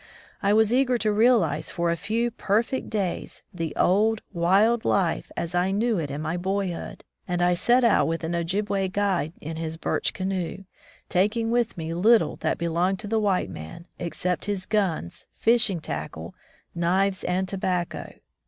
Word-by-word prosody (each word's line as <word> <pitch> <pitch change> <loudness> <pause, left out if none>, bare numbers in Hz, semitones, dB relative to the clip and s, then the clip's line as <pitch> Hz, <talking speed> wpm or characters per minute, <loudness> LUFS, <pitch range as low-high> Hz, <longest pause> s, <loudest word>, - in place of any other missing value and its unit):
I 200 -1 +2
was 220 +1 +4
eager 255 -1 +3
to 215 -2 +1
realize 205 - +3
for 170 -1 0
a - - +1
few 230 +7 -1
perfect 230 +4 -1
days 200 -5 -3
the 165 -3 -3
old, 215 +4 +2
wild 195 +7 +3
life 180 -4 0
as 170 +1 -3
I 180 +1 +2
knew 215 +1 +1
it 150 -3 -3
in 145 +2 -4
my 160 +2 -2
boyhood, 190 -1 -3 0.2
and 175 -1 -1
I 175 0 +3
set 240 +8 +3
out 235 - +4
with 165 +1 -2
an 165 +2 -2
Ojibway 195 +3 0
guide 190 -5 0
in 160 +1 -6
his 160 0 -4
birch - - 0
canoe, 185 -1 -3 0.4
taking 215 +5 +1
with 240 -4 0
me 165 0 -4
little 220 +7 +3
that - - -1
belonged 170 +3 0
to - - -7
the 220 +1 +1
white 200 -3 +1
man, 80 - -9
except 175 +1 -2
his 200 -2 -2
guns, 185 - -1
fishing 225 -6 +3
tackle, 80 - -6 0.4
knives, 185 +3 +1
and 185 +1 0
tobacco. 185 -2 -2
190 Hz, 165 wpm, -25 LUFS, 170-215 Hz, 0.4 s, was